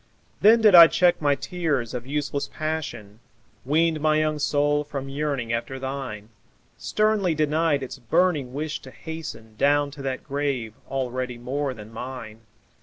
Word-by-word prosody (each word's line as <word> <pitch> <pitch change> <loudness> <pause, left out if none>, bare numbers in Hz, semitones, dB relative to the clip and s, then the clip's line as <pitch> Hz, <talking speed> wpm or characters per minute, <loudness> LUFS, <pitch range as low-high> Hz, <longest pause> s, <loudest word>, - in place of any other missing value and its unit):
Then 225 +3 +6
did 215 -3 +6
I 170 -2 +11
check 175 -1 +2
my 145 -1 +3
tears 145 -7 -2
of 125 0 -5
useless 145 0 -2
passion, 120 -10 -4 0.4
Weaned 155 +3 +1
my 155 0 +3
young 155 -1 0
soul 145 0 +1
from 140 -2 -6
yearning 135 -5 -2
after 120 +3 -3
thine, 130 -6 -5 0.5
Sternly 210 -5 +1
denied 155 -1 +1
its 130 +1 -7
burning 150 0 +1
wish 150 +3 -3
to 130 - -11
hasten 150 -8 -8
Down 145 +2 +2
to 140 - -10
that 135 -1 -3
grave 140 -6 -2 0.2
already 130 -2 -3
more 130 +2 -3
than 105 0 -11
mine! 115 -2 -7
145 Hz, 150 wpm, -24 LUFS, 125-155 Hz, 0.5 s, I